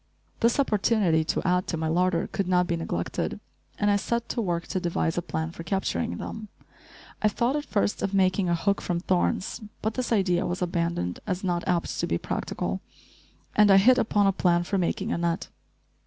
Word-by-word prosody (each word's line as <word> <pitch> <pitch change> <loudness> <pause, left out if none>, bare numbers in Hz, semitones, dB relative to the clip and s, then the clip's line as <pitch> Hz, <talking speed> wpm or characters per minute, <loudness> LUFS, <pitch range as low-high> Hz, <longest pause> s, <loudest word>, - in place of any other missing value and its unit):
This 235 +4 +2
opportunity 210 -9 +2
to 170 - -1
add 180 0 +2
to 165 - -2
my 160 0 -1
larder 175 +1 +1
could 195 - -3
not 180 -1 +3
be 170 -1 -1
neglected, 125 - -3 0.4
and 205 0 +2
I 200 - +4
set 235 +3 -2
to 240 - -1
work 175 -4 -1
to 185 - -1
devise 170 -2 -1
a 175 - 0
plan 160 -1 -3
for 165 - -9
capturing 160 - -1
them. 220 -1 -6 0.7
I 215 - +4
thought, 235 +5 +1
at 295 0 -2
first, 205 -1 0
of 195 - -1
making 185 -1 +2
a 170 - +3
hook 200 +4 0
from 175 -1 -1
thorns; 185 +4 0 0.2
but 220 +1 0
this 255 0 -3
idea 190 -5 +2
was 175 +1 -2
abandoned 170 - -1
as 185 -1 -2
not 175 -2 -1
apt 175 -2 0
to - - 0
be - - 0
practical, - - -3 0.7
and 210 -1 +6
I 195 - +8
hit 250 +6 +6
upon 205 -3 +2
a 195 - +5
plan 175 -2 +2
for 195 +2 -1
making 190 +5 -1
a - - -1
net. 170 0 -1
185 Hz, 200 wpm, -26 LUFS, 170-205 Hz, 0.7 s, I